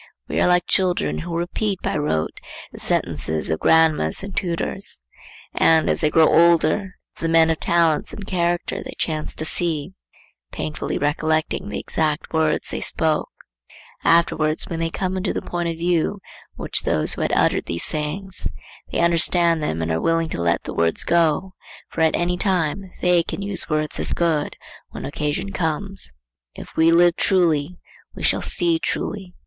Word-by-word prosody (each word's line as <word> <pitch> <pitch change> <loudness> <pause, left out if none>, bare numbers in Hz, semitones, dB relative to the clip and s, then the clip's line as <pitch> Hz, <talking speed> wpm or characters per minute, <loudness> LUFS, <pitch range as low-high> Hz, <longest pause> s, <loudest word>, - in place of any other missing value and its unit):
We - - -1
are - - +4
like 180 0 +3
children 185 -2 +1
who 170 0 -4
repeat 190 +3 -2
by - - -1
rote 145 - -1 0.3
the - - -10
sentences 80 0 -1
of 80 - -1
grandames 160 - +3
and 200 -1 -7
tutors, 175 - -2 0.5
and, 160 -1 +4
as - - -1
they 155 - +3
grow 160 +1 +5
older, 170 +3 +3 0.2
of - - -16
the 165 - 0
men 165 0 +5
of 160 - -2
talents 165 -3 +2
and 200 - -8
character 175 -2 -1
they - - -8
chance 155 -2 -3
to 155 - -3
see,—painfully 160 -1 -3
recollecting 155 +5 0
the - - -3
exact 155 0 -2
words 160 -1 +1
they - - -3
spoke; 160 -1 0 0.7
afterwards, 160 -2 +2
when 165 - -4
they 165 0 0
come 185 +2 -2
into 185 +1 -1
the - - -1
point 175 -1 -2
of 165 - -4
view 175 +3 0 0.4
which - - -2
those 75 - +1
had - - -1
who - - +1
uttered - - +2
these 85 - -2
sayings, 170 +5 -3 0.4
they - - 0
understand 170 0 +3
them 80 - -2
and 80 - -2
are 80 - 0
willing 165 -1 +1
to 85 - -3
let 85 0 +1
the - - -6
words 85 0 +1
go; 170 +2 +1 0.4
for 165 - -4
at 160 -1 +3
any 175 +1 0
time 185 -1 -1
they 180 -1 +4
can 195 - -5
use 200 -1 -3
words 155 -1 -1
as - - 0
good 160 -4 0 0.3
when - - -7
occasion 150 +7 -2
comes. 190 +3 -3 0.4
If - - -11
we 160 +1 +4
live 175 0 +5
truly, 175 -3 +1 0.4
we - - -7
shall - - +2
see 170 -2 +1
truly. 180 +4 -4
165 Hz, 170 wpm, -22 LUFS, 155-180 Hz, 0.7 s, grow